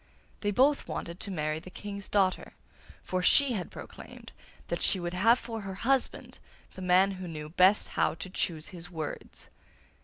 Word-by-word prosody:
They 205 - -1
both 270 +7 +3
wanted 170 +2 -5
to - - -4
marry 155 -4 -2
the 185 - -12
King's 200 +1 -7
daughter, 190 -2 +1 0.5
for 185 0 -2
she 280 +8 +6
had 200 -7 -3
proclaimed - - -11 0.3
that - - -3
she 195 - +5
would 175 0 -4
have 225 +7 +4
for 225 -3 -6
her 195 -1 -6
husband 260 +5 -1 0.3
the 190 - -10
man 185 +2 +4
who 185 -1 -7
knew 155 -2 -7
best 185 +5 +4
how - - 0
to 165 +3 -7
choose 160 -4 -2
his 175 -2 -8
words. 160 -4 -7
185 Hz, 175 wpm, -29 LUFS, 175-205 Hz, 0.5 s, she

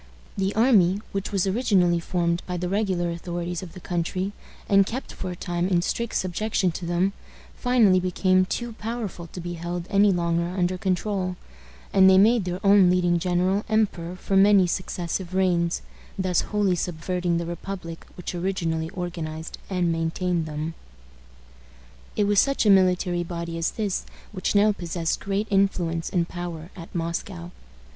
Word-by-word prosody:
The 195 0 -1
army, 205 -5 +4
which 195 0 -3
was 195 -2 +1
originally 190 -5 +2
formed 170 0 0
by 180 -1 -2
the 180 +1 -2
regular 185 -3 0
authorities 175 0 -4
of 180 -3 -9
the - - -9
country, 180 +2 -2 0.4
and 195 -1 +5
kept 240 +7 -5
for 185 - -5
a 180 - -5
time 175 0 -2
in 175 -2 +2
strict 235 +4 -2
subjection 185 0 0
to 170 +1 -6
them, 180 +3 +1 0.4
finally 230 -7 +4
became 185 +1 +2
too 240 +4 -3
powerful 220 -6 -5
to 180 - -9
be 175 0 -5
held 170 +1 -4
any 200 0 +5
longer 170 0 0
under 180 0 +1
control, 185 0 -1 0.6
and 190 -1 +7
they 190 - +6
made 215 +1 +5
their 180 0 -3
own 195 -2 +6
leading 175 -1 +2
general 185 +3 +1
emperor 195 -6 0
for 195 +2 -2
many 195 -1 +6
successive 180 0 -3
reigns, 175 -3 +1 0.3
thus 185 -2 +1
wholly 205 -3 +2
subverting 175 +1 -1
the 170 - -2
republic 170 0 -6
which 180 - -5
originally 170 -3 -1
organized 165 -3 -5
and 180 -3 +1
maintained 165 +1 -1
them. 155 +2 -4 1.4
It 210 - +2
was 205 0 +3
such 275 -4 +1
a 210 - +6
military 180 -2 +3
body 170 -1 -5
as 165 0 0
this 205 -4 -3 0.2
which 190 0 -2
now 210 +1 +5
possessed 170 -3 -2
great 200 +1 -1
influence 175 -4 +1
and 170 -2 0
power 175 -2 -6
at 170 -1 -11
Moscow. 170 +1 -4
180 Hz, 160 wpm, -25 LUFS, 170-195 Hz, 1.4 s, and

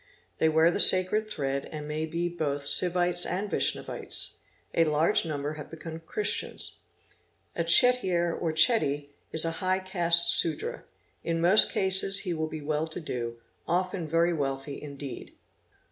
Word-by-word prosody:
They 160 - +3
wear 160 +2 +3
the - - -3
sacred 200 +4 +6
thread 140 -6 -4
and 150 -1 -7
may 155 +1 -4
be 170 +2 -3
both 145 -5 -4
Sivites 175 +2 +1
and 195 +3 -4
Vaishnavites. - - -2 0.4
A 165 - +2
large 155 +2 +1
number 145 -1 -4
have - - -11
become 160 0 -9
Christians. 205 +6 -4 0.8
A 170 - -1
Chettiar 175 -3 +4
or 165 - -3
Chetty 155 - +2 0.2
is 160 0 -1
a 165 - -1
high 185 0 +1
caste 175 -3 +3
Sudra, 160 -3 -5 0.4
in 165 0 -2
most 180 +6 +6
cases 195 +1 +2
he 180 -4 -3
will 160 -1 -3
be 155 -1 -8
well 150 +2 -2
to 160 - -4
do, 120 -7 -6 0.3
often 180 -1 -2
very 165 +2 +1
wealthy 140 -2 -4
indeed. 140 -3 -9
165 Hz, 150 wpm, -27 LUFS, 150-180 Hz, 0.8 s, sacred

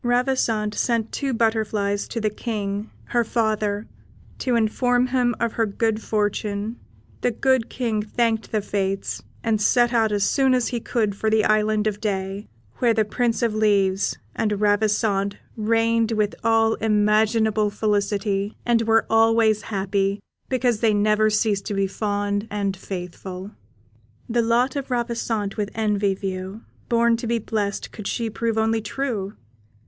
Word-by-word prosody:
Ravissante 240 -4 +1
sent 230 -1 0
two 275 -1 -2
butterflies 215 -3 0
to 230 - -4
the 215 -1 0
King, 210 -2 -3 0.2
her 240 -1 +2
father, 215 -2 0 0.5
to 250 -2 0
inform 245 +2 +2
him 250 -2 +1
of 230 - 0
her 225 -1 +1
good 220 +1 -1
fortune; 210 +1 -2 0.4
the - - +2
good 260 0 +1
King 230 -4 -1
thanked 225 0 -1
the 215 -2 0
Fates, 195 - -2 0.2
and 220 -2 +1
set 240 +3 +3
out 225 -2 +3
as 205 -1 +1
soon 265 +3 +3
as 250 -2 +1
he 240 - -2
could 215 -3 -1
for 220 +2 0
the 215 0 +3
Island 215 0 +2
of 210 -1 -1
Day, 195 -1 -3 0.3
where 235 -2 +2
the 220 -1 +2
Prince 235 +2 0
of 230 -2 +1
Leaves 200 -3 +2 0.2
and 210 -2 0
Ravissante 205 -1 +1 0.2
reigned 225 +1 +1
with 210 -1 +1
all 225 -1 +3
imaginable 215 0 +2
felicity, 205 -1 -1
and 235 -1 +3
were 225 0 +3
always 225 -1 +4
happy, 195 -1 -1 0.3
because 250 -4 +1
they 220 -2 +3
never 215 +1 +3
ceased 210 -2 0
to 205 - -2
be 195 0 +2
fond 205 +1 -2
and 200 -2 -1
faithful. 185 +1 -7 0.8
The 235 +1 +1
lot 235 +4 +2
of 275 -1 -4
Ravissante 230 -4 -2
with 205 -1 -1
envy 205 -3 +1
view 190 +2 -5 0.3
Born 235 0 +3
to 230 - -5
be 235 +1 +1
blest 210 -2 -3
could 210 -3 -7
she 230 -2 -2
prove 230 0 -1
only 225 0 +1
true. 215 -4 -3
215 Hz, 155 wpm, -23 LUFS, 205-230 Hz, 0.8 s, always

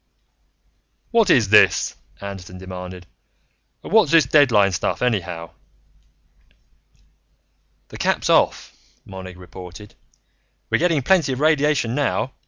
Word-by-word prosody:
"What 230 -4 +3
is 115 - +3
this?" 105 - +4 0.2
Anderton 95 -2 -9
demanded. 90 -1 -9 0.8
"And - - -8
what's 215 -8 +4
this 165 -4 +5
deadline 125 -8 +3
stuff, 90 - -2
anyhow?" 90 -8 -2 2.4
"The - - -10
cap's - - -1
off," - - +1 0.3
Monig 95 -2 -10
reported. 90 +3 -12 0.8
"We're - - +2
getting 165 -5 +1
plenty 165 -5 +2
of 130 - -5
radiation 150 -5 +1
now. 135 -2 -1
110 Hz, 105 wpm, -21 LUFS, 90-150 Hz, 2.4 s, this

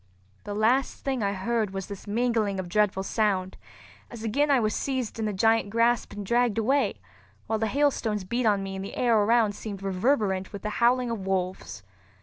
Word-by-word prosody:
The 205 - -4
last 240 +6 +1
thing 265 -3 -1
I 200 -1 0
heard 215 +2 -1
was 195 -1 -3
this 200 0 -9
mingling 220 -3 0
of 185 - -4
dreadful 195 0 +1
sound, 195 -3 0 0.5
as 230 -2 -9
again 280 +7 +1
I 275 -2 +5
was 215 -2 0
seized 260 -5 -3
in 220 - -1
the 210 - 0
giant 225 +2 +2
grasp 230 +1 +1
and 205 -1 -6
dragged 235 0 +2
away, 245 +1 +2 0.5
while 220 0 -1
the 220 - 0
hailstones 240 -6 0
beat 235 +5 -1
on 200 -2 +2
me 195 0 -5
and 190 - -5
the 200 - -7
air 240 -2 +3
around 220 0 +3
seemed 200 -2 -7
reverberant 195 -1 0
with 200 - -8
the 210 - -2
howling 245 0 +3
of 200 -5 -4
wolves. 185 - -3
215 Hz, 195 wpm, -26 LUFS, 195-235 Hz, 0.5 s, I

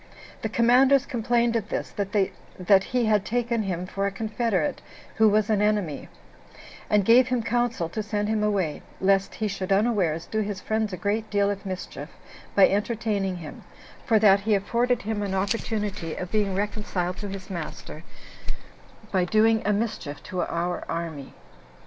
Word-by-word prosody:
The 220 - -2
commanders 255 +5 +4
complained 240 -1 +1
of 220 -2 -1
this, - - -3
that 195 -1 +1
he 250 -2 0
had 210 -2 +3
taken 235 0 0
him 180 -3 -3
for 195 +1 -2
a - - -2
confederate 215 -4 -1 0.4
who 220 -1 +6
was 210 0 +2
an 215 -2 +2
enemy; 205 -8 0 0.8
and 205 -2 +3
gave 245 +3 +6
him 250 -2 0
counsel 235 -6 0
to 215 - -3
send 210 0 -2
him 215 0 0
away, 195 -7 0 0.2
lest 195 0 +2
he 215 - -1
should 195 -1 -4
unawares 195 -6 +2
do 220 - -2
his 205 -2 -2
friends 220 +1 -1
a 185 - -4
great 215 +3 -1
deal 200 0 +2
of 200 0 -6
mischief 185 -1 -6 0.5
by 195 - +7
entertaining 205 -2 -1
him, 160 -3 -9 0.4
for 225 - +3
that 200 -2 +6
he 210 +1 +1
afforded 240 +4 0
him 215 0 -2
an 195 -2 -2
opportunity 205 -3 -2
of 180 0 -6
being 205 -3 +1
reconciled 200 -3 -2
to 205 - -5
his 195 0 -8
master 160 -2 -7 1.1
by 185 -2 +2
doing 220 +4 +3
a - - +4
mischief 205 -9 -3
to 180 -1 -3
our 175 +1 -2
army. 160 -5 -5
205 Hz, 165 wpm, -25 LUFS, 190-220 Hz, 1.1 s, by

